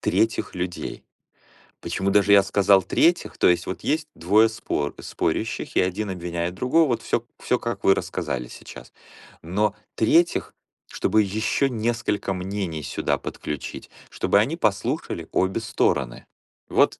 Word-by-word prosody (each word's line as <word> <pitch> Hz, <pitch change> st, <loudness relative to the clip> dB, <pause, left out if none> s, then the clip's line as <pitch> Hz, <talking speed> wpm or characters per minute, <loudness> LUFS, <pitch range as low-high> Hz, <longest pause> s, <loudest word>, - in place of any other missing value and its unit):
третьих 110 Hz, 0 st, 0 dB
людей. 90 Hz, -1 st, -4 dB, 0.8 s
Почему 95 Hz, 0 st, -1 dB
даже 100 Hz, 0 st, +5 dB
я 100 Hz, -1 st, +7 dB
сказал 100 Hz, -1 st, +4 dB
третьих? 170 Hz, +1 st, +2 dB
То -, -, +4 dB
есть 85 Hz, -1 st, +3 dB
вот 95 Hz, -, -5 dB
есть 155 Hz, +1 st, 0 dB
двое 105 Hz, +6 st, +4 dB
спор 75 Hz, -9 st, -3 dB
спорящих, -, -, -2 dB
и -, -, +4 dB
один 95 Hz, +3 st, -1 dB
обвиняет 85 Hz, -1 st, -3 dB
другого, 135 Hz, -, +3 dB
вот 115 Hz, -2 st, 0 dB
всё 115 Hz, -, -1 dB
всё, 125 Hz, -, +1 dB
как 120 Hz, 0 st, -4 dB
вы 95 Hz, -, +5 dB
рассказали 60 Hz, -1 st, -3 dB
сейчас. -, -, -12 dB, 0.5 s
Но 100 Hz, +5 st, 0 dB, 0.2 s
третьих, 165 Hz, +9 st, +2 dB, 0.4 s
чтобы 110 Hz, -, +2 dB
ещё 110 Hz, +7 st, 0 dB
несколько 115 Hz, -4 st, -1 dB
мнений 90 Hz, -4 st, -4 dB
сюда -, -, -1 dB
подключить, 75 Hz, -3 st, -6 dB, 0.2 s
чтобы 100 Hz, -, +2 dB
они 135 Hz, +10 st, +1 dB
послушали 100 Hz, -, -1 dB
обе 95 Hz, +4 st, +1 dB
стороны. 65 Hz, -, 0 dB, 0.4 s
Вот, -, -, +2 dB
100 Hz, 140 wpm, -24 LUFS, 90-115 Hz, 0.8 s, я